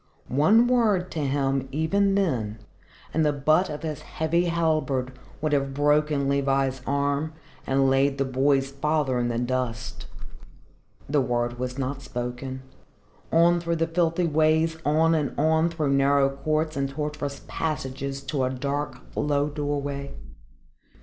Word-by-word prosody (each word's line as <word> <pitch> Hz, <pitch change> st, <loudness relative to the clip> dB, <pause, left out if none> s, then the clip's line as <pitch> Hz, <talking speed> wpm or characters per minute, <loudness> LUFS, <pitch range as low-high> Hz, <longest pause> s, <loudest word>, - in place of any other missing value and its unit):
One 200 Hz, -, +5 dB
word 215 Hz, -7 st, +2 dB
to 160 Hz, -, -4 dB
him, 135 Hz, -2 st, 0 dB
even 195 Hz, +7 st, +1 dB
then, 120 Hz, -, 0 dB, 0.6 s
and 160 Hz, -, +2 dB
the 150 Hz, -, +3 dB
butt 155 Hz, +6 st, +2 dB
of 150 Hz, +1 st, -6 dB
his 155 Hz, -2 st, -4 dB
heavy 165 Hz, +3 st, 0 dB
halberd 155 Hz, -6 st, 0 dB, 0.3 s
would 155 Hz, -, +1 dB
have 140 Hz, -1 st, 0 dB
broken 145 Hz, -1 st, +2 dB
Levi's 135 Hz, -1 st, +1 dB
arm 140 Hz, +2 st, 0 dB, 0.3 s
and 135 Hz, 0 st, +3 dB
laid 135 Hz, +1 st, +2 dB
the 135 Hz, -, +1 dB
boy's 135 Hz, +1 st, +1 dB
father 140 Hz, -2 st, 0 dB
in 120 Hz, -, 0 dB
the 120 Hz, -1 st, -1 dB
dust. 120 Hz, -3 st, -3 dB, 1.0 s
The 145 Hz, 0 st, +2 dB
word 120 Hz, -1 st, -1 dB
was 125 Hz, +1 st, -3 dB
not 135 Hz, +1 st, -3 dB
spoken. 125 Hz, +1 st, -5 dB, 0.7 s
On 170 Hz, +1 st, +4 dB
through 170 Hz, 0 st, -1 dB
the 165 Hz, 0 st, +1 dB
filthy 165 Hz, +1 st, +1 dB
ways, 160 Hz, +1 st, +2 dB
on 160 Hz, +3 st, +3 dB
and 150 Hz, -4 st, -1 dB
on, 160 Hz, +2 st, +3 dB
through 155 Hz, -4 st, 0 dB
narrow 140 Hz, 0 st, +3 dB
courts 155 Hz, +3 st, -1 dB
and 140 Hz, 0 st, -1 dB
tortuous 150 Hz, 0 st, -4 dB
passages 140 Hz, -3 st, -3 dB
to 140 Hz, -1 st, -1 dB
a -, -, 0 dB
dark 140 Hz, +3 st, -3 dB, 0.2 s
low 145 Hz, 0 st, +1 dB
doorway. 145 Hz, -1 st, -3 dB
145 Hz, 145 wpm, -25 LUFS, 135-160 Hz, 1.0 s, One